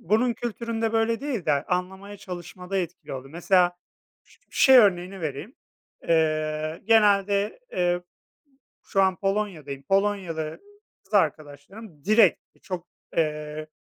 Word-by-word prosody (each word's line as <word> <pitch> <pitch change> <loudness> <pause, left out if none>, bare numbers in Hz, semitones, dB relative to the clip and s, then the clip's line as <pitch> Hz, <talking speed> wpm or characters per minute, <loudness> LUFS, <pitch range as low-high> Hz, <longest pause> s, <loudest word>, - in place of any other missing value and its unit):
bunun 225 +6 +2
kültüründe 230 -1 -3
böyle 225 0 +1
değil 265 - -3
de 150 - +4
a 140 +1 0
anlamaya 190 +3 -7
çalışmada 180 0 -7
etkili 175 -3 -5
oldu. 135 0 -7
Mesela 175 +1 +2 0.5
ş - - -24
şey 265 -1 +6
örneğini 190 -3 +2
vereyim: 155 - -5 0.5
Eee, 155 -1 0
genelde, 205 - +3
eee 175 0 0 0.8
şu 195 - +1
an 190 -1 +2
Polonya'dayım. 190 -9 -3
Polonyalı 185 -4 -1 0.4
kız - - -11
arkadaşlarım 150 +4 -2
direkt 215 +3 +5 0.2
çok, 180 -3 -6 0.3
eee, 150 -1 -2
185 Hz, 115 wpm, -25 LUFS, 155-210 Hz, 0.8 s, şey